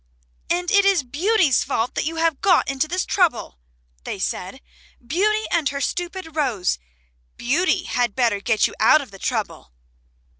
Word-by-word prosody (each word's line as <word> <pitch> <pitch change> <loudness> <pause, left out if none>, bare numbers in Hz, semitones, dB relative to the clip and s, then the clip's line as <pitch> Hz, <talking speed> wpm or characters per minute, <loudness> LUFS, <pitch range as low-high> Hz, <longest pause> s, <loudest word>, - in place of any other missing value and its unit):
"And 355 0 0
it 400 -1 +5
is 390 -6 +3
Beauty's 310 - +2
fault 225 +2 -2
that - - -2
you 325 +2 -3
have 325 -3 0
got 365 -4 +3
into 275 +2 -1
this 365 +4 -2
trouble," 310 - 0 0.4
they - - -5
said. - - -4 0.5
"Beauty 425 - +1
and 325 -4 +1
her 280 - -4
stupid 350 +2 -4
rose. 235 - 0 0.6
Beauty 345 +8 +1
had 245 -4 -1
better 235 -5 +1
get 220 +1 +2
you - - -2
out 310 - +5
of 270 - -11
the 195 - -13
trouble." 60 - -4
310 Hz, 160 wpm, -22 LUFS, 245-360 Hz, 0.6 s, it